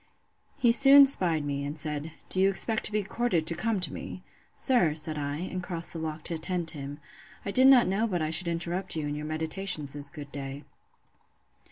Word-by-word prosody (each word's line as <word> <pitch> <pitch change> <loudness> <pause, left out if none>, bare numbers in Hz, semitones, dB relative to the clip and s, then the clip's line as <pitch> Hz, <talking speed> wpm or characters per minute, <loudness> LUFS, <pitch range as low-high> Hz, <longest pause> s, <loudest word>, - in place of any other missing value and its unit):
He 245 -4 +3
soon 275 +3 +8
'spied 170 - +2
me, 140 -1 -4
and 145 +2 -6
said, 150 0 -3 0.2
Do 185 - -1
you 195 - +4
expect 215 +3 -1
to - - +2
be 210 0 -1
courted 210 -5 -2
to 170 - +4
come 215 +5 -2
to 155 -6 -2
me? 185 - -9 0.3
Sir, 175 - +1
said 155 0 +1
I, 145 -1 -4
and 185 +2 -6
crossed 170 -2 -4
the 165 - -6
walk 155 -1 -6
to - - +2
attend 170 +1 -4
him, 145 -1 -9 0.5
I 200 - -3
did 260 +5 +4
not 260 -3 +6
know 200 +5 -1
but 180 -5 -3
I 155 -1 -3
should 175 +2 +5
interrupt 175 +2 -3
you 155 -2 -4
in 145 - -4
your 150 +1 -6
meditations 155 -1 -1
this 145 -1 -4
good 145 0 -11
day. 140 0 -8
165 Hz, 210 wpm, -27 LUFS, 150-195 Hz, 0.5 s, soon